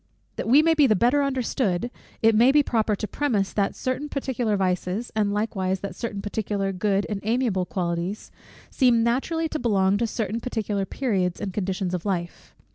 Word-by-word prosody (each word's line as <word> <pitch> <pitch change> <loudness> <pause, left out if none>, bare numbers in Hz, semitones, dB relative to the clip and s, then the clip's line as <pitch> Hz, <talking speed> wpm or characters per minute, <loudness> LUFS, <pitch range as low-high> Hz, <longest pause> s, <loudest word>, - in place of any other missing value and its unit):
That - - -4
we 275 +6 +6
may 325 0 +4
be 300 -3 +5
the 215 - +4
better 245 +8 +3
understood, 245 -6 -1 0.3
it 225 0 +6
may 235 +5 +5
be 295 +1 +5
proper 220 -4 +1
to 215 - -4
premise, 210 -5 -1
that 200 -2 0
certain 270 +3 -3
particular 250 -7 -1
vices, 185 +4 -1
and 210 -2 +1
likewise 195 -3 -1
that 200 - -5
certain 210 -4 -5
particular 205 -2 -2
good 195 +1 0
and 205 -2 -3
amiable 220 -5 0
qualities, 175 +2 -3 0.4
seem 245 -4 +3
naturally 295 +8 0
to 310 - -3
belong 200 -4 +2
to 235 - +1
certain 220 0 -2
particular 210 -5 -2
periods 190 -9 -1
and 200 -3 -4
conditions 190 -2 -2
of 180 -2 -2
life. 175 -4 -4
215 Hz, 180 wpm, -25 LUFS, 195-245 Hz, 0.4 s, we